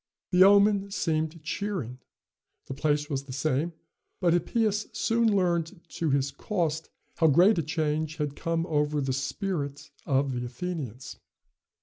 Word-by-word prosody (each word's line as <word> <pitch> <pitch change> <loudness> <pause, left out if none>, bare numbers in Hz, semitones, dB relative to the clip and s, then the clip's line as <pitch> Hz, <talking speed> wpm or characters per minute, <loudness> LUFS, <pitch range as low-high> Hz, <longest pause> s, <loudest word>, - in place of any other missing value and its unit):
The 180 0 +7
omen 200 0 +5
seemed 160 -3 -2
cheering. 155 - -3 0.7
The - - -6
place 145 +1 0
was 140 -2 -3
the 135 - -9
same, 150 +4 0 0.5
but 175 -3 +3
Hippias 210 +4 +1
soon 230 -1 +2
learned 175 -2 0
to 170 -2 -2
his 140 0 +1
cost 160 0 -2 0.3
how 165 - +4
great 175 +7 +5
a - - +2
change 155 0 -1
had 150 -3 -3
come 165 0 -1
over 150 -2 0
the 135 -2 -1
spirit 140 0 -3 0.2
of 135 0 +2
the 125 -1 -3
Athenians. 130 -2 -6
160 Hz, 140 wpm, -27 LUFS, 140-180 Hz, 0.7 s, The